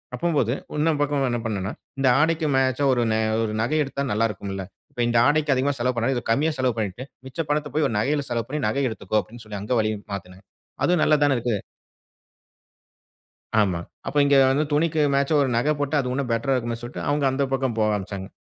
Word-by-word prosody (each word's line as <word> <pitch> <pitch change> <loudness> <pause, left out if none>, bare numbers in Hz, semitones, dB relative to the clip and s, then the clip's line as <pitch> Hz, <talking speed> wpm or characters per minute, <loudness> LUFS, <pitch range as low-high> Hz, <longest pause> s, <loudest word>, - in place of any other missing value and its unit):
அப்பம்போது 145 -9 +1 0.2
இன்னொரு 155 +2 +2
பக்கம் 145 -2 +1
என்ன 120 - -1
பண்ணன்னா, 100 -3 -2 0.3
இந்த 135 - +2
ஆடைக்கு 160 +1 +2
மேட்சா 130 +1 +2
ஒரு 120 - +1
ந - - +2 0.3
ஒரு 110 -1 -2
நகை 155 +7 +1
எடுத்தா 140 +1 -3
நல்லாருக்கும்ல்ல! 100 -3 -2 0.3
இப்ப 120 - -4
இந்த 120 0 +2
ஆடைக்கி 150 -1 +2
அதிகமா 135 +2 +1
செலவு 125 +1 0
பண்ணாம 125 +3 +1
இத 120 - -4
கம்மியா 150 +7 +2
செலவு 130 -3 +1
பண்ணிட்டு, 105 +3 -3 0.2
மிச்ச 130 - -11
பணத்த 150 -1 -1
போய் 150 -2 +3
ஒரு 110 - -3
நகையில 145 +4 0
செலவு 115 -1 -1
பண்ணி 150 0 -2
நகை 135 +5 0
எடுத்துக்கோ! 110 -1 -2
அப்பிடின்னு 115 +1 -13
சொல்லி 105 -1 -6
அங்க 110 +5 -2
வழியும் 110 -1 -1
மாத்துனேன். 95 0 -8 0.4
அதுவும் 175 -2 +3
நல்லா 155 - +4
தானே 140 -2 +3
இருக்கு. 115 -2 -1 2.0
ஆமா. 95 -4 0 0.3
அப்ப 145 - -2
இங்க 140 0 +4 0.2
வந்து 140 +3 +2
துணிக்கு 155 +1 +2
மேட்சா 140 +3 +1
ஒரு 135 - +1
நகை 145 +6 +2
போட்டா, 145 +1 -1
அது 125 - -4
உன்னும் 135 -1 -2
பெட்ரா 115 +4 +1
இருக்குமேன்னு 115 -2 -3
சொல்ட்டு 120 - -6
அவுங்க 145 0 +1
அந்த 135 +2 0
பக்கம் 130 -3 0
போக 110 -1 +2
ஆரம்பிச்சாங்க. 100 -1 -5
130 Hz, 200 wpm, -24 LUFS, 110-145 Hz, 2.0 s, நல்லா